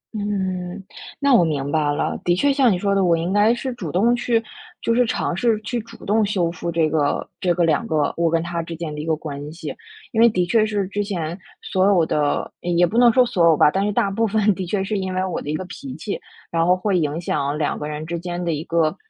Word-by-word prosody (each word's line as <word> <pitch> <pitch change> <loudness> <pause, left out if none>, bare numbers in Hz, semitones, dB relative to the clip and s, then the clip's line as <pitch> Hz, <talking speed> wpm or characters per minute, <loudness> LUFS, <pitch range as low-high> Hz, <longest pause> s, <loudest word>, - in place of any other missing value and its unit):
嗯， 190 -2 -3 0.4
那 280 -2 +3
我 220 - +6
明 145 -3 -1
白 150 -2 +1
了。 145 - -2
的 175 0 +2
确 285 +8 +2
像 265 -5 +4
你 185 - +1
说 200 +2 0
的， 195 -1 +2
我 170 -2 +3
应 170 +4 -2
该 210 +2 +4
是 245 +1 -2
主 180 -11 -6
动 225 +8 +3
去， 240 -1 +1 0.4
就 230 - 0
是 245 +2 +4
尝 175 - -1
试 225 +1 +1
去 240 +2 -3
主 225 - -14
动 215 +2 +2
修 185 -5 0
复 170 0 -4
这 165 -1 +2
个 150 -2 0
这 180 - +1
个 175 - +2
两 160 -2 +1
个 150 -2 0
我 170 0 +1
跟 165 0 +1
他 170 0 -3
之 165 0 -7
间 160 -2 -5
的 150 - -5
一 155 - -7
个 160 - +2
关 150 -1 -7
系。 160 -2 -7 0.4
因 225 - +1
为 235 - +7
的 180 -5 0
确 220 +5 +3
是 205 -3 -1
之 205 +1 -1
前， 175 -5 -3 0.3
所 190 +1 +1
有 180 -5 +4
的 145 -2 0
也 175 0 +2
不 205 - -5
能 240 -1 +7
说 255 +1 +4
所 175 -7 +2
有 160 -3 +5
吧， 150 - +5
但 195 +2 0
是 - - 0
大 200 -1 +1
部 225 +3 +1
分 210 0 +2
的 185 -1 -5
确 195 +1 -1
是 205 0 -2
因 190 -1 -3
为 185 0 0
我 185 - -3
的 145 - -6
一 155 - -1
个 185 - -4
脾 255 +8 -8
气， 205 - -5 0.3
然 165 -1 +1
后 180 +1 +4
会 185 0 0
影 150 +1 -1
响 145 -3 -1
两 150 - -1
个 150 - -4
人 150 +1 -5
之 170 +1 -4
间 175 0 -4
的 170 - 0
一 150 0 -3
个 165 -2 +1
180 Hz, 285 characters per minute, -21 LUFS, 165-210 Hz, 0.4 s, 为